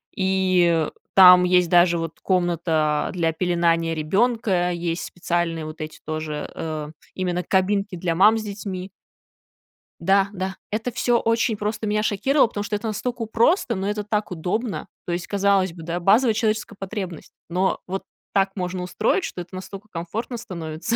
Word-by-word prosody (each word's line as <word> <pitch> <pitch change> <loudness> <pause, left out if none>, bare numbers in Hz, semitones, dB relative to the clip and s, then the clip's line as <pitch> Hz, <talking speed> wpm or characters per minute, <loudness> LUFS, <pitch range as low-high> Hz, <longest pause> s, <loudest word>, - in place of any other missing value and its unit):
И 185 -4 +2 0.3
там 180 -1 +9
есть 180 -1 +3
даже 175 -1 +5
вот 165 -1 -5
комната 165 -4 +1
для 165 -2 +1
пеленания 165 -1 +1
ребёнка, 190 +2 +1
есть 170 0 -2
специальные 170 -2 -2
вот 155 +1 -8
эти 155 0 -7
тоже, 155 -1 -4
э, 155 -2 -4 0.3
именно 180 -1 -1
кабинки 195 +1 +1
для 170 -1 -1
мам 210 +6 +5
с 220 - -3
детьми. 195 -2 -6 1.1
Да, 195 +3 +3
да, 190 0 -3 0.2
это 225 +3 -2
всё 240 +1 +2
очень 230 0 +1
просто 210 +1 -3
меня 210 0 +1
шокировало, 240 +7 +3
потому 205 -2 -4
что 210 0 -2
это 215 +2 -3
настолько 230 +2 -3
просто, 230 - +2
но 190 +1 -2
это 210 0 -2
так 210 -1 -2
удобно. 195 +6 -2 0.2
То 175 - -2
есть, 175 0 -3
казалось 195 -3 +2
бы, 165 - -10
да, 170 +2 -3
базовая 220 +7 +4
человеческая 215 -1 -1
потребность, 190 -4 -6 0.2
но 185 +2 +1
вот 190 +1 -3 0.3
так 195 0 +2
можно 180 -1 -3
устроить, 215 - 0
что 180 - -5
это 175 +2 -12
настолько 195 +2 -8
комфортно 210 +9 -4
становится. 170 +1 -4
185 Hz, 160 wpm, -23 LUFS, 170-210 Hz, 1.1 s, там